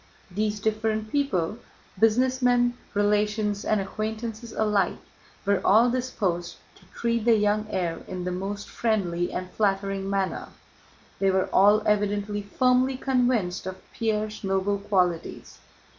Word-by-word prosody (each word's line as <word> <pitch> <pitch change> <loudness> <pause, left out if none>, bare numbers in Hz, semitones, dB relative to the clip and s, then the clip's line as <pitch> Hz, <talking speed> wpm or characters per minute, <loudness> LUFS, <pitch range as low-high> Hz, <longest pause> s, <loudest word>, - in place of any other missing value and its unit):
These 210 +2 -1
different 215 0 -1
people—businessmen, 245 - +1 0.2
relations, 210 0 +1
and 215 - +1
acquaintances 220 +3 -4
alike—were 200 -1 -1
all 230 +5 +5
disposed 195 -9 -2 0.2
to - - -21
treat 235 -1 0
the 230 0 +5
young 210 0 +1
heir 175 -4 -2
in 185 -1 -5
the 180 - -2
most 195 +3 -4
friendly 180 -7 -1
and 185 0 -5
flattering 195 -1 0
manner: 195 -1 -1 0.7
they 195 - +3
were 190 0 +1
all 205 +2 +5
evidently 205 0 0
firmly 255 +5 +2
convinced 245 -10 0
of 185 0 -5 0.2
Pierre's 215 -1 -2
noble 195 +1 0
qualities. 185 -4 -1
210 Hz, 115 wpm, -26 LUFS, 195-225 Hz, 0.7 s, all